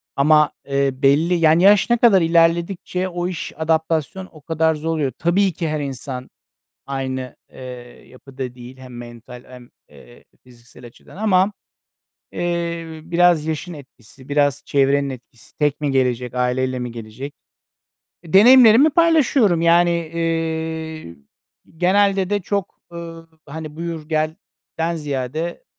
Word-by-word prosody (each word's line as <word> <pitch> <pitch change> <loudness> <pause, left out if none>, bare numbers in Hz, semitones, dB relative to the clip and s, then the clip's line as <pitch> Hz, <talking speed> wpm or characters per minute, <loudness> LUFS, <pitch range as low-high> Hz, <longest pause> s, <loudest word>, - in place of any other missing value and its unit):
ama, 150 +2 +4 0.2
eee, 140 0 +1
belli, 140 +6 +2
yani, 165 0 +3
yaş 205 +3 +5
ne 240 - +3
kadar 215 -6 +5
ilerledikçe 170 +3 +1
o 175 0 -3
iş, 180 -2 -6
adaptasyon 160 +3 -1
o 155 - -16
kadar 160 +1 0
zor 155 +2 -5
oluyor. 145 -5 -1
Tabii 185 +2 +1
ki 165 +1 -3
her 155 - -2
insan 130 -1 -6 0.6
aynı, 130 -2 -4 0.2
eee, - - -13 0.5
yapıda 130 -1 -9
değil 125 +1 -12
hem 125 -2 -11
mental 120 +1 -11
hem, 125 -1 -14 0.2
eee, - - -18 0.2
fiziksel 120 0 -16
açıdan 120 - -17
ama, 195 -1 +2 0.8
eee, 170 -1 -3 0.2
biraz 170 -1 +2
yaşın 160 +3 -4
etkisi, 130 -2 -15
biraz 145 -2 +1
çevrenin 140 0 +1
etkisi, 120 -3 -13
tek 150 0 0
mi 145 - 0
gelecek, 125 -2 0
aileyle 125 +1 -1
mi 125 -1 -5
gelecek? 115 +5 -8 0.9
E, 165 - -13
deneyimlerimi 245 +6 +7
paylaşıyorum, 280 - +3
yani, 170 +1 +4
eee, 160 - -3 0.6
genelde 195 +2 +2
de 205 - 0
çok, 200 0 -4
ııı, 165 -1 -9 0.2
hani, 155 +1 -8
buyur 165 -2 -6
gelden 160 +1 -4
ziyade 150 - -4
160 Hz, 130 wpm, -20 LUFS, 135-175 Hz, 0.9 s, deneyimlerimi